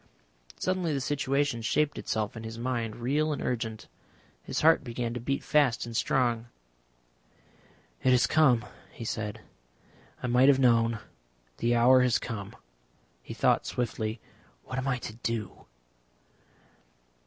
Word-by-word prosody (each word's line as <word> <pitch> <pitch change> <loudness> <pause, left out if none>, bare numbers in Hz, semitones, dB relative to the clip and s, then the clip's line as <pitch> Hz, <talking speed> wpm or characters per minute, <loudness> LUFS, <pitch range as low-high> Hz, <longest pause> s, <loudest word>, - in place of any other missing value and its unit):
Suddenly 185 -4 -1
the - - 0
situation 140 -2 0
shaped 145 +6 +1
itself 110 0 -2
in 115 - -7
his 115 0 -7
mind 115 -2 -2
real 145 +6 0
and 145 - -2
urgent. 115 -3 -3 0.5
His - - -3
heart 160 0 +5
began 120 -1 -3
to 120 - -4
beat 135 +4 -2
fast 140 -7 +2
and 115 -1 -8
strong. 120 -4 +1 1.5
"It - - +2
has 125 -1 +5
come," 135 -8 +3 0.3
he 115 - -8
said. 110 -1 -4 0.8
"I - - -1
might 125 +2 +5
have 140 - +6
known. 115 -3 +3 0.6
The 120 +1 +1
hour 125 +2 +6
has 125 -1 +3
come." 110 -2 -6 0.7
He - - -9
thought - - +2
swiftly. 110 -2 -3 0.4
"What 130 - -4
am 130 - -3
I 130 -2 +1
to 110 - -7
do?" 115 -4 -4
120 Hz, 140 wpm, -28 LUFS, 115-135 Hz, 1.5 s, have